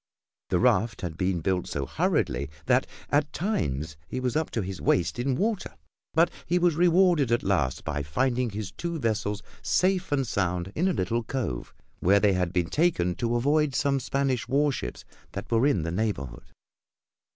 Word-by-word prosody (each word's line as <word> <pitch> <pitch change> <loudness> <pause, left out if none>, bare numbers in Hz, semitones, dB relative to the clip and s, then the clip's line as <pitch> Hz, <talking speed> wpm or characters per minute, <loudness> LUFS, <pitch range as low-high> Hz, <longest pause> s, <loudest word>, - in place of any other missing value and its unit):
The - - +2
raft 105 +3 +2
had 85 -4 -4
been 90 -1 0
built 90 +1 0
so 70 -1 -3
hurriedly 65 +2 0 0.2
that - - +3 0.2
at 145 0 +2
times 75 - -2
he 130 - -4
was 125 -2 -1
up 160 0 0
to 115 - -2
his 95 0 -6
waist 90 +6 +1
in 130 +1 +1
water, 210 - -1 0.4
but 165 +2 +4 0.2
he 175 - +2
was 175 -1 +3
rewarded 175 -5 +4
at 120 - +2
last 85 -10 0
by 75 0 -2
finding 125 - 0
his 105 -1 -5
two 170 -1 -4
vessels 105 -5 -1 0.2
safe 185 -1 +1
and 135 -2 +2
sound 90 -4 -1
in 180 +4 +1
a 190 - +2
little 110 +4 0
cove 115 - -3 0.3
where 100 +3 +4
they 100 -1 +3
had 90 -2 0
been 90 -1 -1
taken 145 - +2
to 120 -1 0
avoid 145 +3 +2
some 140 -1 +2
Spanish 135 -2 -1
warships 140 - 0 0.3
that 100 +4 -6
were 115 +4 +4
in 95 - +2
the 85 - -2
neighborhood. 85 - -3
115 Hz, 175 wpm, -27 LUFS, 90-145 Hz, 0.4 s, but